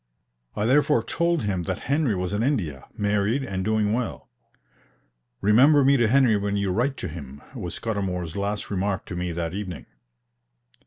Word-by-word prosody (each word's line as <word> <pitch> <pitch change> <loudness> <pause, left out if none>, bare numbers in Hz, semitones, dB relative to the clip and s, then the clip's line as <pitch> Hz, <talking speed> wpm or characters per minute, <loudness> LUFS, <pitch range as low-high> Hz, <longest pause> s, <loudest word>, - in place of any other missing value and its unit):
I 105 - -1
therefore 145 +4 +3
told 170 -2 0
him 95 -4 -1
that - - -1
Henry 140 -5 +1
was 90 +1 -3
in 105 - 0
India, 90 - -1
married, 105 +5 +1
and 95 -7 -3
doing 110 0 +1
well. 120 0 -3 1.1
"Remember 135 +8 +5
me 140 +1 +5
to 120 -4 +3
Henry 125 -2 +4
when 100 0 -1
you 100 -2 0
write 125 +8 0
to - - -4
him," 70 -4 -9
was 90 - -5
Scudamour's 95 -7 -3
last 100 +1 -3
remark 95 0 -1
to - - -6
me 90 0 -2
that 85 0 -3
evening. 95 -3 -5
105 Hz, 165 wpm, -25 LUFS, 90-125 Hz, 1.1 s, Remember